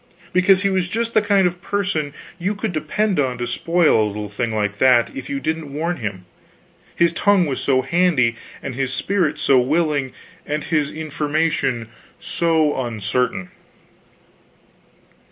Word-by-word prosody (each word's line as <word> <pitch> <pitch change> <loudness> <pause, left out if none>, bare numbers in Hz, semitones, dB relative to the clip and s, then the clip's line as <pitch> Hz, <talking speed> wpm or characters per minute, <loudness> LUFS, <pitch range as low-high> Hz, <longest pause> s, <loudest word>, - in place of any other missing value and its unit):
Because 185 +1 +4
he 200 - +3
was 185 -1 0
just 230 +3 -2
the 215 - +4
kind 200 -2 +3
of 175 0 -1
person 185 -8 -1 0.3
you 195 +4 -1
could 205 -2 -3
depend 185 +5 0
on 130 -3 0
to 120 - -2
spoil 165 +1 +2
a - - +1
little 105 0 -5
thing 115 +3 -2
like 105 -1 -2
that 125 -3 +4
if 135 -1 -7
you 140 - -2
didn't 160 -1 -3
warn 165 +5 -2
him, 100 -6 -5 0.7
his 170 -1 +3
tongue 200 +1 +3
was 140 -4 -2
so 130 -2 +2
handy, 135 -6 +2 0.3
and 140 - -4
his 130 +1 -2
spirit 170 -1 0
so 135 -3 +4
willing, 145 0 +1 0.3
and 150 +1 -3
his 150 -3 0
information 150 -5 -1 0.3
so 160 -5 +1
uncertain. 110 -3 -2
150 Hz, 155 wpm, -21 LUFS, 125-175 Hz, 0.7 s, Because